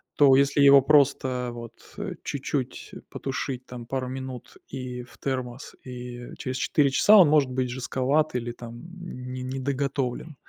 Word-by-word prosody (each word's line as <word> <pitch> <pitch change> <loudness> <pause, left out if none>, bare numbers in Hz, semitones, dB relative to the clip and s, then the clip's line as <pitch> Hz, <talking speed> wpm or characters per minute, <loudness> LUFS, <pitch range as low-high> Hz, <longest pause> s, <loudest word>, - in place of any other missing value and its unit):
То 140 -3 +6
если 140 +1 +3
его 140 -1 +8
просто 130 -3 +2
вот, 115 -1 -8 0.2
э, - - -4
чуть-чуть - - -4 0.2
потушить 135 -2 -4
там 120 -2 -9
пару 130 -1 -2
минут 130 -1 -7
и 125 -2 -6
в 120 - -17
термос, 130 -1 -4
и 125 -1 -8
через 130 -2 -4
4 140 +1 +2
часа 210 +10 +6
он 175 -7 +8
может 150 -3 +4
быть 130 0 -1
жестковат 130 +4 0
или 120 -1 -2
там 120 0 -10 0.2
не 125 -6 -7
недоготовлен. 135 +2 -2
130 Hz, 150 wpm, -26 LUFS, 125-140 Hz, 0.2 s, его